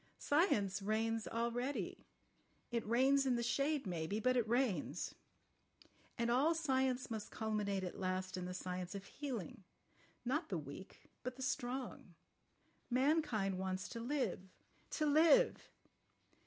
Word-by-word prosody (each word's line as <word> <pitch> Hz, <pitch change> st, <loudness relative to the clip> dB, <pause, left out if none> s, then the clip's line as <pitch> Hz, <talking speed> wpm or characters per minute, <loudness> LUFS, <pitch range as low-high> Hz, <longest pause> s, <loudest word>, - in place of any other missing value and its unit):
Science 205 Hz, -, +2 dB
reigns 220 Hz, +2 st, 0 dB
already. 240 Hz, +4 st, -2 dB, 0.6 s
It 235 Hz, -1 st, 0 dB
reigns 265 Hz, +4 st, +4 dB
in 250 Hz, -, +3 dB
the 235 Hz, -, 0 dB
shade 275 Hz, +3 st, +1 dB
maybe—but 200 Hz, +8 st, 0 dB
it 240 Hz, -3 st, +2 dB
reigns. 215 Hz, -, 0 dB, 1.0 s
And 235 Hz, 0 st, +1 dB
all 290 Hz, +7 st, +4 dB
science 265 Hz, -5 st, +1 dB
must 220 Hz, -2 st, -4 dB
culminate 210 Hz, -3 st, -1 dB
at 180 Hz, +2 st, -5 dB
last 185 Hz, 0 st, -1 dB
in 180 Hz, -1 st, -3 dB
the 180 Hz, -, -4 dB
science 180 Hz, 0 st, -4 dB
of 195 Hz, 0 st, -6 dB
healing—not 255 Hz, -, -6 dB
the 185 Hz, -, 0 dB
weak, 150 Hz, +5 st, -9 dB
but 255 Hz, 0 st, -4 dB
the 265 Hz, -, -6 dB
strong. 255 Hz, -, -3 dB, 0.7 s
Mankind 250 Hz, -, +2 dB
wants 185 Hz, 0 st, -2 dB
to 230 Hz, -, -5 dB
live—to 250 Hz, -, -3 dB
live." 320 Hz, +12 st, +5 dB
235 Hz, 120 wpm, -38 LUFS, 195-265 Hz, 1.0 s, live